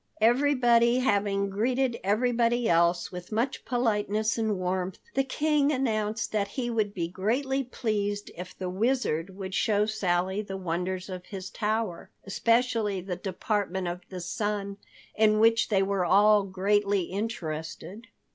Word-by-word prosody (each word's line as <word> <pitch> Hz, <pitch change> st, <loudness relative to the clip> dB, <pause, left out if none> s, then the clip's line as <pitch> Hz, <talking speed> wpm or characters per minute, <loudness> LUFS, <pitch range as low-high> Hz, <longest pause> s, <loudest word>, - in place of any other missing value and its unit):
Everybody 240 Hz, 0 st, +4 dB
having 200 Hz, -5 st, +1 dB
greeted 245 Hz, +4 st, 0 dB
everybody 235 Hz, +3 st, +2 dB
else 170 Hz, +1 st, +2 dB
with 180 Hz, +2 st, -8 dB
much 235 Hz, +5 st, -1 dB
politeness 220 Hz, -2 st, 0 dB
and 220 Hz, -3 st, 0 dB
warmth, 185 Hz, 0 st, -2 dB, 0.2 s
the 270 Hz, -, +2 dB
King 295 Hz, +1 st, +1 dB
announced 225 Hz, -4 st, -1 dB
that 205 Hz, -2 st, 0 dB
he 240 Hz, +3 st, -3 dB
would 215 Hz, -3 st, 0 dB
be 175 Hz, -4 st, -3 dB
greatly 255 Hz, +10 st, -1 dB
pleased 205 Hz, -4 st, -2 dB
if 180 Hz, +2 st, -9 dB
the 185 Hz, -, -4 dB
Wizard 195 Hz, -4 st, 0 dB
would 190 Hz, -1 st, -6 dB
show 210 Hz, +1 st, +2 dB
Sally 190 Hz, -2 st, 0 dB
the 195 Hz, -2 st, -6 dB
wonders 180 Hz, +1 st, -3 dB
of 185 Hz, -2 st, -7 dB
his 190 Hz, -2 st, -7 dB
tower, 215 Hz, -4 st, -2 dB
especially 230 Hz, -1 st, +1 dB
the 180 Hz, 0 st, -4 dB
Department 190 Hz, 0 st, -2 dB
of 175 Hz, +1 st, -4 dB
the 185 Hz, -2 st, -6 dB
Sun, 200 Hz, +2 st, -3 dB, 0.4 s
in 215 Hz, -1 st, +3 dB
which 225 Hz, +1 st, +4 dB
they 195 Hz, -3 st, +3 dB
were 195 Hz, -1 st, 0 dB
all 205 Hz, +4 st, +5 dB
greatly 200 Hz, +1 st, +1 dB
interested. 185 Hz, 0 st, -5 dB
205 Hz, 140 wpm, -27 LUFS, 190-230 Hz, 0.4 s, all